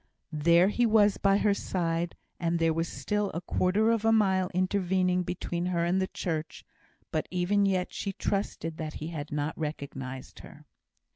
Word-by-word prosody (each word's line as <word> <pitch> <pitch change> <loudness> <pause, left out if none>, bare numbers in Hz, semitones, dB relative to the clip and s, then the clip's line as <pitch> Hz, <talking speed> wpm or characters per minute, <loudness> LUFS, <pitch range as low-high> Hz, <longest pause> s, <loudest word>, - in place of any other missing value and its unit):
There 170 +5 +4
he 240 +3 +2
was 210 -2 +4
by 195 0 +3
her 205 0 +3
side; 170 -3 -2 0.2
and 170 0 0
there 165 -1 +2
was 165 +1 -4
a 205 -5 0
quarter 195 +5 +2
of 225 -2 +1
a 225 - +4
mile 190 -4 +3
intervening 185 0 +1
between 175 0 -3
her 170 -2 0
and 185 +2 +1
the 190 - 0
church; 160 -4 -4 0.5
but 155 - -1
even 190 +3 +2
yet 185 -2 0
she 200 - -3
trusted 185 -5 -2
that 155 -1 -5
he 155 - -5
had 150 -3 -6
not 150 +1 -2
recognised 135 -4 -6
her. - - -13
180 Hz, 165 wpm, -29 LUFS, 165-195 Hz, 0.5 s, There